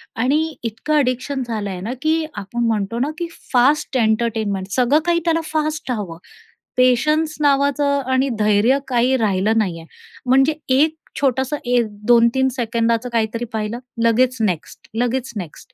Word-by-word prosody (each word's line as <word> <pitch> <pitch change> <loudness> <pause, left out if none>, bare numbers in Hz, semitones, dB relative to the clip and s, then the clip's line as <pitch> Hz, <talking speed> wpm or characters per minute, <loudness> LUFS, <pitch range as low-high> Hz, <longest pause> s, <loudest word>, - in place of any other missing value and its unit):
आणि 300 +7 0
इतकं 230 +7 -3
ॲडिक्शन 265 0 0
झालं 215 -3 -3
आहे 180 -1 -5
ना, 225 +5 -3
की 315 +1 +1
आपण 210 +4 -3
म्हणतो 220 +1 -1
ना, 280 +4 0
की 345 - -3 0.3
फास्ट 260 +2 +3
एंटरटेनमेंट 220 -4 0
सगळं 260 +4 +3
काही 345 -1 +2
त्याला 330 -1 +2
फास्ट 310 -2 -2
हवं. 200 -8 -4 0.6
पेशन्स 300 +5 +2
नावाचं 280 0 +2
आणि 260 +1 +2
धैर्य 215 +5 +3
काही 250 +1 +2
राहिलं 215 0 +1
नाही 185 -6 0
आहे. 165 - -13 0.4
म्हणजे 270 +4 +4 0.2
1 315 +3 +3 0.3
छोटंसं 265 +2 +1
1-2-3 235 +2 +2
सेकंदाचं 230 0 0
काहीतरी 230 0 -1
पाहिलं, 220 +2 -3 0.2
लगेच 245 +2 +3
नेक्स्ट, 180 -7 -3
लगेच 245 +3 -1
नेक्स्ट 180 -6 -8
245 Hz, 140 wpm, -20 LUFS, 220-280 Hz, 0.6 s, म्हणजे